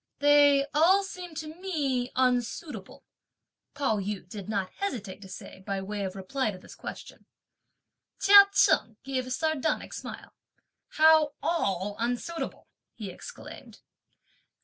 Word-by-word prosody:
"They 285 -1 +5
all 355 +7 +5
seem 360 -3 -8
to 310 0 -6
me 275 -10 -1
unsuitable!" 250 - -1 0.7
Pao 275 -7 0
yü 195 -2 -4
did 200 +1 -8
not 195 -3 -2
hesitate 220 - -4
to 190 - -11
say 185 - -10
by 195 0 -3
way 200 +1 -4
of 190 0 -4
reply 220 +6 -2
to 195 - -6
this 185 - -13
question. - - -10 0.9
Chia 400 0 +9
Cheng 225 - +3
gave 260 -2 -3
a - - -6
sardonic 315 +2 -1
smile. - - -8 0.6
"How 315 -1 +5
all 200 - -1
unsuitable?" 245 +8 -3 0.3
he 210 -5 -6
exclaimed. - - -11
255 Hz, 125 wpm, -28 LUFS, 205-315 Hz, 0.9 s, Chia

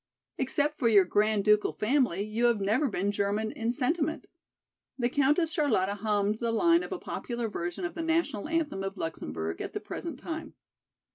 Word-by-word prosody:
Except 290 +3 0
for 240 - +3
your 205 -4 +6
Grand 210 +2 +2
Ducal 210 0 +4
family 220 -5 +1
you 215 +3 -1
have 235 -3 +3
never 215 +9 +2
been 200 -3 -1
German 205 +2 -1
in 230 +1 -1
sentiment." 305 +4 -1 0.7
The 240 -2 +1
Countess 295 +5 +2
Charlotta 275 - +1
hummed 210 0 0
the 235 -1 0
line 335 +9 +4
of - - -7
a - - -2
popular 235 -1 -4
version 175 - -4
of 360 - -4
the 330 - -4
national 325 -9 0
anthem 315 -11 -1
of 195 +1 -4
Luxemburg 80 - -4
at - - -5
the - - -2
present - - -6
time. - - -6
225 Hz, 180 wpm, -29 LUFS, 205-290 Hz, 0.7 s, your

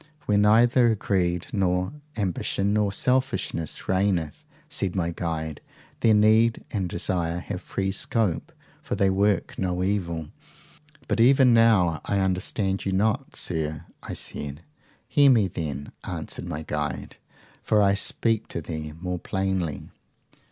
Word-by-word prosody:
Where 105 -1 +2
neither 115 +3 +5
greed 90 -3 0
nor 90 +1 0 0.2
ambition 100 0 0
nor 105 -1 +2
selfishness 125 - -1
reigneth, 95 -5 0 0.2
said 95 -1 -1
my 85 -2 0
guide, 80 -3 -4 0.4
there 110 -2 +4
need 110 +2 +4
and 95 -5 -2
desire 85 -1 -1
have 90 0 -5
free 95 0 -2
scope, 100 -2 0 0.3
for - - -3
they 100 -1 +2
work 100 +1 +1
no 90 -1 -1
evil. 85 -5 -2 0.8
But - - 0
even 130 +1 +6
now 105 -8 +4
I 100 - -1
understand 95 +1 -1
you 95 - -1
not, 110 +8 0
sir, 80 -4 -2 0.2
I - - -6
said. 75 +2 -5 0.4
Hear 145 -1 +5
me 115 -7 +4
then, 75 -5 -5
answered - - -5
my 80 -2 -4
guide, 75 -3 -4 0.4
for 105 - +2
I 100 -1 +5
will 100 - +2
speak 115 +2 0
to 85 - -4
thee 75 -1 -6
more 90 0 -3
plainly. 95 -7 -2
95 Hz, 135 wpm, -25 LUFS, 85-105 Hz, 0.8 s, even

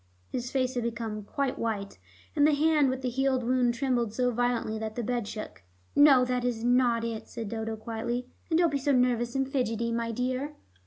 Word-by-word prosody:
His 245 0 -3
face 260 -1 0
had 245 - -1
become 225 -2 -3
quite 270 +6 -2
white, 210 -3 -3 0.4
and 295 -1 +5
the 305 - +3
hand 300 -2 +3
with 260 0 -3
the 250 - 0
healed 260 0 +1
wound 245 0 +2
trembled 240 -4 0
so 250 0 +2
violently 240 -2 0
that 220 0 -4
the 240 - -2
bed 240 -2 -1
shook. 215 - -7 0.3
"No, 280 -3 +7
that 250 0 -1
is 240 -2 -1
not 245 -1 +3
it," 230 -1 -4
said 225 -3 -6
Dodo 225 0 -3
quietly. 230 +2 -3 0.2
"And 320 - +3
don't 340 -2 +3
be 280 - 0
so 280 +1 +1
nervous 245 -1 +2
and 270 0 +1
fidgety, 235 -4 -1
my 230 0 -1
dear." 255 +5 -2
245 Hz, 205 wpm, -28 LUFS, 230-260 Hz, 0.4 s, No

